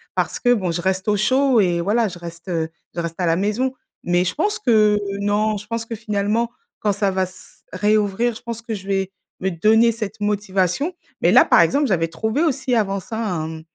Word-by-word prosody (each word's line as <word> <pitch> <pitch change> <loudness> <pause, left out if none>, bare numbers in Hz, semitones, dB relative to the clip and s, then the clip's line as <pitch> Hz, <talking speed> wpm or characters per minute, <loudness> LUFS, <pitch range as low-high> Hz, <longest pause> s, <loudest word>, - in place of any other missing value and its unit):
parce - - -1
que 245 -1 +4
bon, 190 -7 -1
je 165 - -2
reste 190 +2 -1
au 210 - +2
chaud 260 +4 +3
et 175 -4 +2
voilà, 215 +5 +2
je 180 - -8
reste, 170 0 -10
heu, 165 -2 -1 0.3
je - - -3
reste 170 -1 -4
à 180 - +1
la 165 -1 +3
maison, 210 +8 0 0.3
mais 175 +1 +2
je - - -2
pense 415 +6 0
que 215 - +4 0.2
non, 210 +1 +1
je 205 - -9
pense 230 +1 -4
que 230 - -5
finalement, 215 +2 -1 0.3
quand 210 - +2
ça 200 0 0
va 190 0 0
s 185 0 -11
réouvrir, 210 +3 +1
je - - -10
pense 230 -1 -5
que 230 -1 -5
je 190 -2 -9
vais 195 -1 -1 0.3
me 190 - 0
donner 220 +7 +4
cette 220 -1 -6
motivation, 205 - 0 0.3
mais - - +4
là, - - +7
par - - +6
exemple, 285 0 +2
j'avais 165 -6 +1
trouvé 220 - -1
aussi 265 -5 0
avant 200 -3 +1
ça 220 +4 -7 0.2
un 160 -1 -4
205 Hz, 220 wpm, -21 LUFS, 185-230 Hz, 0.3 s, là